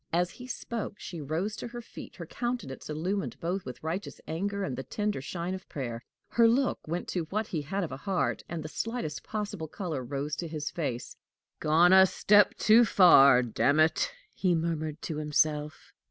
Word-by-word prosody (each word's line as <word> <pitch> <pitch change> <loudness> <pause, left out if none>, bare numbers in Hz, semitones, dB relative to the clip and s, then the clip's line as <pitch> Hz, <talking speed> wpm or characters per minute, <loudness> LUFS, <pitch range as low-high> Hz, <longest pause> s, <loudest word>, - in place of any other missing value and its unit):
As 175 +1 +1
he 250 - -11
spoke, 230 -4 -5
she 170 -3 -7
rose 165 +9 -2
to - - -5
her 240 0 -7
feet, 235 - -11
her - - -7
countenance 240 - -4
illumined 180 +6 -2
both 180 +3 -2
with 125 +2 -8
righteous 170 +5 -4
anger 200 +5 -2
and 135 -9 -3
the - - -4
tender 210 +2 -2
shine 170 +5 -4
of 190 -1 -8
prayer. 120 -5 -4 0.3
Her 235 -1 +5
look 250 +3 +2
went 170 +3 -3
to 175 -3 -2
what 215 +2 -1
he 165 -7 -3
had 195 +7 -2
of 165 - -4
a 130 - -5
heart, 185 +6 -1
and 165 -2 -4
the - - -5
slightest 225 -3 -4
possible 205 -6 -4
color 155 -6 -4
rose 140 +4 -3
to 170 - -3
his 155 -2 -4
face. 130 -7 -4 0.4
"Gone 165 +4 +5
a 190 0 +8
step 205 +2 +4
too 225 +2 +6
far, 140 - +7
damn 135 +5 +2
it!" 160 - +3 0.2
he 180 -3 +1
murmured 160 -2 -2
to 155 - -3
himself. 150 0 0
170 Hz, 190 wpm, -29 LUFS, 150-200 Hz, 0.4 s, a